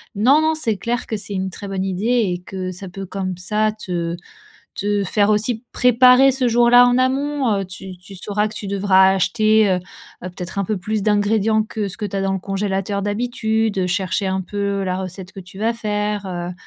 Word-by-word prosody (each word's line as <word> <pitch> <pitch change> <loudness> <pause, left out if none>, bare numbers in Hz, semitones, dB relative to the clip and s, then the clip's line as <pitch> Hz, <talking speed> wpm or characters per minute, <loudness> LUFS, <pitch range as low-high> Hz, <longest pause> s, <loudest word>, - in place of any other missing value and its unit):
non, 260 +9 +4
non 315 0 +2
c'est 230 -10 -1
clair 240 +4 -2
que 220 - -2
c'est 205 0 -7
une 190 0 -2
très 200 +3 -8
bonne 195 -1 -2
idée 190 +2 -3 0.3
et 175 - -6
que 185 -1 -5
ça 185 +1 -9
peut 195 +1 -7
comme 185 -1 -4
ça 215 +4 0
te 175 -5 -4 0.6
te 205 0 -1
faire 205 +2 +1
aussi 215 +2 0
préparer 250 +2 +5
ce 260 -1 0
jour-là 240 +1 +6
en 245 0 +3
amont, 265 0 +1
heu, - - -3
tu 185 0 -10
tu 190 +2 -14
sauras 210 +3 -1
que 215 - -12
tu 210 -1 -6
devras 190 -1 +4
acheter, 215 +2 +3
heu, 185 - +2 0.5
heu, 185 - -4
peut-être 180 +2 -7
un 200 - +1
peu 210 +1 -2
plus 210 +3 -2
d'ingrédients 215 +1 +2
que 215 -1 -4
ce 190 - -10
que 210 - -2
tu 200 - -5
as 195 - -1
dans 195 0 0
le 195 - -1
congélateur 195 +1 -2
d'habitude, 220 0 -1
heu, 180 - 0
chercher 190 +2 -1
un 190 0 -1
peu 200 +1 -2
la 185 -1 -1
recette 185 0 -8
que 195 - -9
tu 190 +1 -13
vas 225 +3 0
faire, 210 -2 -2
heu 175 -1 -4
205 Hz, 215 wpm, -20 LUFS, 190-220 Hz, 0.6 s, jour-là